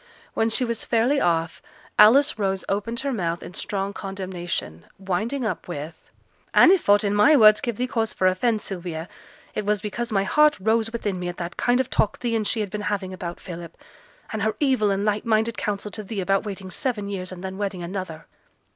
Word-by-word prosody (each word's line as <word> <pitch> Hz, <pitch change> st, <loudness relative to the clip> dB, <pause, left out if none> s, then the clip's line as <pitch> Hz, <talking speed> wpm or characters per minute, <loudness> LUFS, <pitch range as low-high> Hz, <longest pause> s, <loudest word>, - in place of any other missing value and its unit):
When 225 Hz, 0 st, +1 dB
she 250 Hz, +3 st, +1 dB
was 235 Hz, -1 st, -2 dB
fairly 245 Hz, +5 st, +2 dB
off, 165 Hz, -1 st, 0 dB, 0.4 s
Alice 250 Hz, +5 st, +6 dB
Rose 195 Hz, -2 st, -1 dB
opened 230 Hz, +5 st, -2 dB
her 275 Hz, -1 st, -2 dB
mouth 170 Hz, -6 st, -2 dB
in -, -, -9 dB
strong 195 Hz, +1 st, -3 dB
condemnation; 180 Hz, -, -5 dB
winding 215 Hz, +8 st, -2 dB
up 215 Hz, -, -3 dB
with 155 Hz, -2 st, -5 dB, 0.6 s
'And 350 Hz, -, +8 dB
if 375 Hz, -, +2 dB
aught 205 Hz, +1 st, +6 dB
in 200 Hz, -1 st, +1 dB
my 210 Hz, +10 st, +6 dB
words 215 Hz, -5 st, +7 dB
gave 235 Hz, -4 st, -3 dB
thee 250 Hz, -, 0 dB
cause 225 Hz, -4 st, -1 dB
for 185 Hz, -, -1 dB
offence, 210 Hz, +4 st, +2 dB
Sylvia, 175 Hz, -3 st, -5 dB, 0.5 s
it 215 Hz, -, -2 dB
was 210 Hz, 0 st, +1 dB
because 230 Hz, +3 st, -4 dB
my 195 Hz, -2 st, +2 dB
heart 300 Hz, +9 st, +4 dB
rose 220 Hz, +3 st, +1 dB
within 205 Hz, -5 st, -3 dB
me 180 Hz, -, -3 dB
at 175 Hz, -, -5 dB
the 170 Hz, 0 st, -4 dB
kind 245 Hz, +1 st, +2 dB
of 260 Hz, -, -1 dB
talk 210 Hz, -, +1 dB
thee 235 Hz, -2 st, -1 dB
and 215 Hz, -2 st, 0 dB
she 225 Hz, -, 0 dB
had 205 Hz, -3 st, -4 dB
been 210 Hz, -, -4 dB
having 190 Hz, -2 st, -3 dB
about 175 Hz, -2 st, -6 dB
Philip; 170 Hz, -1 st, -9 dB, 0.6 s
and 215 Hz, -, -2 dB
her 220 Hz, +1 st, 0 dB
evil 260 Hz, -8 st, +2 dB
and 200 Hz, +1 st, 0 dB
light 210 Hz, 0 st, 0 dB
minded 225 Hz, 0 st, +1 dB
counsel 210 Hz, -1 st, -3 dB
to 215 Hz, -, -6 dB
thee 210 Hz, 0 st, -5 dB
about 195 Hz, +2 st, +1 dB
waiting 195 Hz, -2 st, -6 dB
seven 230 Hz, -6 st, -2 dB
years, 190 Hz, -2 st, -4 dB
and 185 Hz, 0 st, -9 dB
then 190 Hz, +1 st, -5 dB
wedding 195 Hz, -3 st, -3 dB
another.' 170 Hz, -3 st, -6 dB
205 Hz, 210 wpm, -24 LUFS, 185-225 Hz, 0.6 s, And